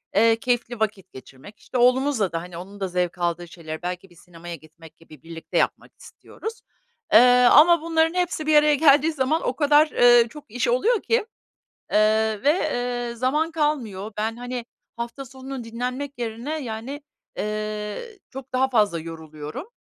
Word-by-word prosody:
eee, 225 +2 +5
keyifli 240 -1 -1
vakit 205 -4 -3
geçirmek, 135 +10 -13
işte, 255 - -5
oğlumuzla 250 -4 +2
da, 165 - -3
hani, 175 0 -10
onun 195 +4 -10
da 195 - -2
zevk 180 0 -2
aldığı 175 0 -2
şeyleri 160 -1 -8
belki 180 +1 -5
bir 175 - -21
sinemaya 170 0 -10
gitmek 160 +1 -17
gibi 155 -4 -17
birlikte 165 0 -6
yapmak - - 0
istiyoruz. 445 +1 -9 0.5
Eee, - - +10 0.3
ama 335 +1 +7
bunların 325 0 +1
hepsi 355 -3 -1
bir 310 - +4
araya 300 0 +5
geldiği 290 +1 +5
zaman 305 +3 0
o 250 - -1
kadar, 295 +1 +4
ııı, 240 -1 +6
çok 290 -2 -13
iş 245 +1 -1
oluyor 415 - +2
ki, 455 - +1 0.8
ııı, 215 0 +2
ve, 290 - +5
eee, 245 -7 -2
zaman 295 +7 0
kalmıyor. 245 -11 -2
Ben, 220 +1 -1
hani, 245 -1 -5 0.3
hafta 235 +4 -6
sonunu 260 0 -8
dinlenmek 250 +5 -4
yerine, 240 +7 -4
yani, 240 +5 -6 0.4
eee, 215 - -4
çok 265 -1 -10
daha 260 +1 +2
fazla 210 -9 +2
yoruluyorum. 160 - -8
235 Hz, 160 wpm, -23 LUFS, 190-285 Hz, 0.8 s, Eee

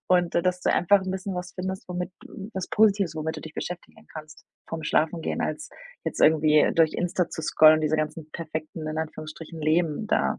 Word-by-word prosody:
Und 180 -2 +2
d 170 - +2
dass 180 0 0
du - - +2
einfach 200 +3 +4
'n 190 - -4
bisschen 190 +1 -4
was 180 0 -5
findest, 190 0 -5
womit 180 0 -3 0.4
was 190 -2 -3
Positives, 200 -5 +3
womit 160 0 -3
du - - -6
dich 160 - -10
beschäftigen 180 0 -7
kannst 155 0 -10 0.2
vorm 165 -1 -5
Schlafengehen, 160 +2 0
als - - -3 0.4
jetzt - - -3
irgendwie 155 -1 +5
durch 165 -1 +3
Insta 175 0 0
zu - - -5
scrollen 155 0 +6
und 155 - -2
diese 155 0 +1
ganzen 155 0 -3
perfekten 155 -1 -6
in 155 +1 -3
Anführungsstrichen 155 +1 -7
Leben 160 +5 +1
da, - - +1
165 Hz, 195 wpm, -26 LUFS, 155-180 Hz, 0.4 s, scrollen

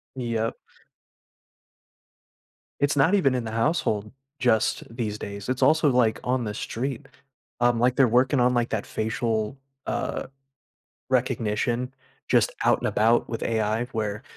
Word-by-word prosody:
Yep. 115 -3 -2 2.2
It's 145 0 +2
not 160 +9 +4
even 140 -10 +3
in 125 - -1
the 110 - -4
household, 110 -4 0 0.3
just 115 -3 +2
these 110 -3 -3
days, 100 +2 -7
it's 130 +1 -2
also, 155 +1 +4
like, 120 -3 +2
on 125 -1 0
the 105 -1 -4
street. 135 +5 -4 0.5
Um, 120 -1 +3
like, 125 +1 +2
they're 135 - +6
working 125 +4 +3
on, 125 0 +3
like, 120 -1 +1
that 110 -2 -2
facial, 110 +1 -2 0.3
uh, - - -2 0.8
recognition. 125 0 0 0.4
Just - - +3
out - - +4
and - - -3
about 115 +2 +2
with 115 - -4
AI, 110 +1 0
where 110 -3 -3
120 Hz, 140 wpm, -25 LUFS, 110-130 Hz, 2.2 s, they're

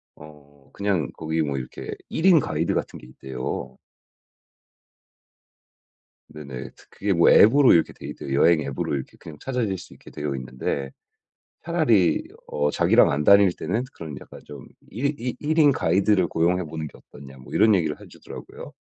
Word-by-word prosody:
어 70 -2 -17
그냥 95 -8 -1
거기 80 0 -2
뭐 70 -3 -2
이렇게 65 -1 -7 0.2
1 160 - -3
인 180 -4 +7
가이드 - - -1
같은 - - -4
게 - - -15
있대요. 65 0 -6 2.5
네네. 70 -5 -9 0.2
그게 100 0 -2
뭐 85 -1 +5
앱으로 130 +5 +6
이렇게 85 - +3
돼 - - -11
있대요. 70 - -7
여행 80 +3 +4
앱으로 70 +1 -3
이렇게 65 -2 -6
그냥 75 -2 -12
찾아낼 120 -7 -2
수 - - -13
있게 - - -16
되어 75 -2 -4
있는데 65 +1 -4 0.7
차라리 120 - +2 0.2
어 75 0 -1
'자기랑 - - +4
안 75 +2 -1
다닐 100 -2 +6
때는 100 +10 -3
그런 80 -4 -8
약간 - - -13
좀 70 -2 -11 0.2
이 125 +7 -2
이 125 +1 -4
1 155 +2 -1
인 150 -2 +6
가이드를 95 -1 +2
고용해 90 +2 +1
보는 80 0 -6
게 - - -17
어떻냐.' 65 -1 -14
뭐 65 - -14
이런 110 -1 +5
얘기를 80 -5 -1
해 - - -12
주더라고요. - - -11
80 Hz, 320 characters per minute, -23 LUFS, 70-100 Hz, 2.5 s, 인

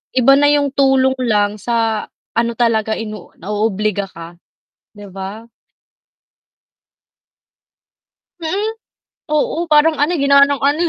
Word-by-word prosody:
Iba 260 +2 +5
na 290 - +4
yung 290 -1 +2
tulong 265 -1 +2
lang, 210 -3 0
sa 225 -2 -1 0.2
ano 235 0 0
talaga, 220 -2 +1
ino 215 -4 -8
naoobliga 210 0 -2
ka, 170 -1 -12 0.5
'di 205 -1 -12
ba? 195 +4 -8 2.9
Mm. 395 +7 -2 0.6
Oo, 320 +3 0
parang 310 0 +4
ano, 295 +4 +1
eh, 325 - -1
ginawa 280 0 +6
ng 280 -2 -2
ano, 285 +3 +1
235 Hz, 115 wpm, -17 LUFS, 210-285 Hz, 2.9 s, ginawa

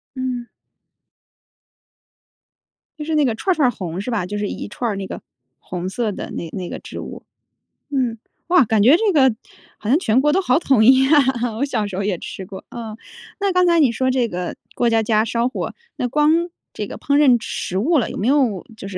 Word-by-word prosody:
嗯。 255 -2 -3 2.5
就 300 - -5
是 320 -1 -1
那 300 - +3
个 235 - +1
串 375 - -1
儿 - - -7
串 290 -5 +3
儿 - - +2
红 180 -4 -5
是 245 - -4
吧？ 210 -6 -1
就 205 +3 -4
是 205 - -1
一 - - -5
串 235 +3 -3
儿 200 - -3
那 195 -1 -5
个 - - -7 0.4
红 180 0 -5
色 220 +1 -1
的 - - -6
那 165 - -5
那 185 -3 -5
个 - - -6
植 - - -9
物。 - - -8 0.7
嗯， 250 -5 0 0.3
哇， 355 -4 +5
感 215 -1 +2
觉 270 +7 +7
这 420 +2 +2
个 265 -5 +5 0.4
好 215 - -5
像 275 - +5
全 245 -4 +2
国 295 +1 +3
都 380 - +2
好 295 -4 +2
统 265 -9 +3
一 265 +1 +6
啊， 250 -6 +2
我 280 - +1
小 215 -7 -1
时 190 - -6
候 200 - -1
也 195 -3 -1
吃 190 - -7
过， 190 0 -10
嗯。 225 -3 -7 0.4
那 400 -1 +1
刚 365 0 +3
才 340 -1 +4
你 275 -6 +4
说 260 +3 0
这 250 -2 +1
个 180 0 -4 0.2
过 240 - +2
家 225 -1 +2
家 215 0 +2
烧 235 +1 0
火， - - -4 0.2
那 245 - -1
光 300 +4 +3 0.4
这 - - -4
个 - - -8
烹 285 0 +1
饪 265 -5 +6
食 185 -4 -4
物 305 - +2
了， 250 - 0
有 - - -6
没 215 - -1
有 260 -9 +2
就 195 - -8
是 190 - -5
240 Hz, 240 characters per minute, -20 LUFS, 210-280 Hz, 2.5 s, 觉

